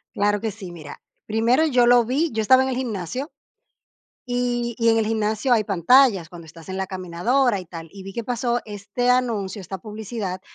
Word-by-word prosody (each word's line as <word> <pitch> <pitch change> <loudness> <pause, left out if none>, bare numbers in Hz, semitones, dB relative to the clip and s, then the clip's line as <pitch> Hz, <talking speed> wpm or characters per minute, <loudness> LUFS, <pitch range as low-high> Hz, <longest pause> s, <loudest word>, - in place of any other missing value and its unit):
Claro 205 0 +1
que 220 -2 -2
sí. 190 -4 -9
Mira, 155 -4 -10 0.3
primero 230 +8 +2
yo 250 -5 +3
lo 245 -1 +6
vi, 285 +6 0
yo 220 0 -1
estaba 260 +5 +5
en 265 - -1
el 255 - -2
gimnasio. 250 - -4 1.0
Y 245 -1 -1
y 230 0 +4
en 225 - +4
el 220 - +1
gimnasio 220 +3 +1
hay 220 -2 +3
pantallas 200 - +4
cuando 170 -2 -11
estás 165 +2 -14
en 190 - -4
la 190 -1 -2
caminadora 195 +6 0
y 180 - -9
tal. 165 -1 -9
Y 195 -1 -11
vi 195 - -8
que 235 +4 -4
pasó 240 +1 -1
este 210 +4 -3
anuncio, 225 -5 -1
esta 190 +1 -6
publicidad 210 -1 -6
220 Hz, 200 wpm, -23 LUFS, 190-245 Hz, 1.0 s, lo